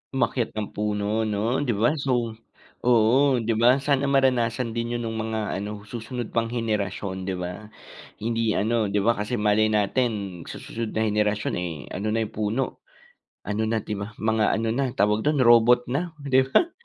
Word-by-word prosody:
Umakyat 115 -2 0
ng 105 -1 -3
puno 105 +1 -1
'no, 110 +5 0
'di 125 -7 0
ba? 115 +7 +3
So 120 -4 0 0.5
oo, 125 +3 +4
'di 115 - 0
ba? 125 +2 +6
Sana 140 -1 +2
maranasan 125 -3 +2
din 115 +1 -2
'yon 120 - -3
no'ng 110 0 -3
mga 110 0 -2 0.2
ano, 105 0 -6
susunod 115 +2 -6
pang 115 0 0
henerasyon, 100 -5 -3
'di 95 - -1
ba? 90 +4 -6 0.5
Hindi 115 0 0
ano 110 0 +1
'di 105 - +1
ba 115 +4 +3
kasi 105 +3 -3
malay 105 +1 +3
natin 105 -4 0
sa - - -8
susunod 115 -1 -5
na 110 0 0
henerasyon, 105 0 0
eh, 90 -2 -3 0.2
ano 105 +3 -2
na 110 0 0
yung 110 - -15
puno, 110 +5 -2 0.6
ano 105 +2 -2
na, 110 -1 0
'di 105 -2 -4
ba, 105 +2 -6
mga 110 -1 +2
ano 110 0 -1
na, 135 +3 0
tawag 105 +2 +1
do'n, 150 -3 +3
robot 120 +1 +6
na, 160 +5 -2
'di 130 -1 +3
ba, 335 - +3
110 Hz, 180 wpm, -25 LUFS, 105-120 Hz, 0.6 s, ba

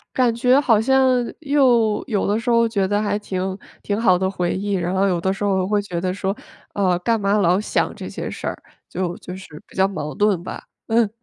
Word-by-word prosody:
感 245 -3 +2
觉 250 +3 +4
好 225 -6 +3
像 265 +3 +3 0.4
又 255 -8 +3
有 210 -6 0
的 205 +2 +1
时 235 +2 -2
候 230 -1 +4
觉 200 -4 0
得 205 +1 +1
还 210 0 0
挺 190 -2 -3 0.3
挺 205 +1 -2
好 185 -6 +4
的 190 0 0
回 180 -2 -1
忆， 200 +1 -3
然 175 0 -1
后 195 +1 +2
有 175 -2 0
的 190 +2 0
时 195 +1 -4
候 190 -2 +1
会 205 0 +1
觉 180 -4 -4
得 185 +1 -1
说， 195 +1 -2 0.4
呃， 185 -3 +1
干 225 +4 +1
嘛 200 0 +1
老 185 0 +3
想 - - -1
这 - - -7
些 - - -5
事 - - -7
儿， - - -4 0.3
就 180 -1 -3
就 180 +1 -8
是 160 -5 -12
比 - - -18
较 190 0 +4
矛 150 -6 -5
盾 205 -4 +1
吧， - - -7 0.2
嗯。 225 -1 +3
200 Hz, 245 characters per minute, -21 LUFS, 185-225 Hz, 0.4 s, 觉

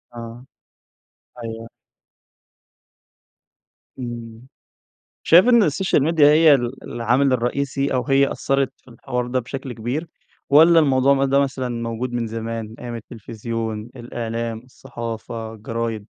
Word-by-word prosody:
آه، 115 +1 -9 1.0
أيوه. 115 0 -6 2.3
إمم، 120 -1 -7 0.8
شايف 175 +5 +7
إن 235 -3 +6
السوشيال 155 -2 +1
ميديا 155 -1 +4
هي 155 0 +6
ال 120 +1 -4
العامل 120 +4 +1
الرئيسي 135 +3 -1
أو 125 - 0
هي 140 -1 +3
أثرت 135 -1 0
في - - -36
الحوار 125 +1 -4
ده 130 +1 0
بشكل 130 +1 -6
كبير، 125 +9 -4 0.4
والّا 165 +4 +7
الموضوع 135 -2 +4
مد 135 0 +1
ده 140 +1 +4
مثلًا 130 -2 -1
موجود 115 +1 -3
من 120 -1 -1
زمان، 115 0 -5
أيام 120 -1 -6
التِّلفزيُون، 115 0 -6
الإعلام، 115 -1 -4
الصَّحافة، 115 -2 -7
الجرايد؟ 115 -1 -4
120 Hz, 120 wpm, -21 LUFS, 115-135 Hz, 2.3 s, شايف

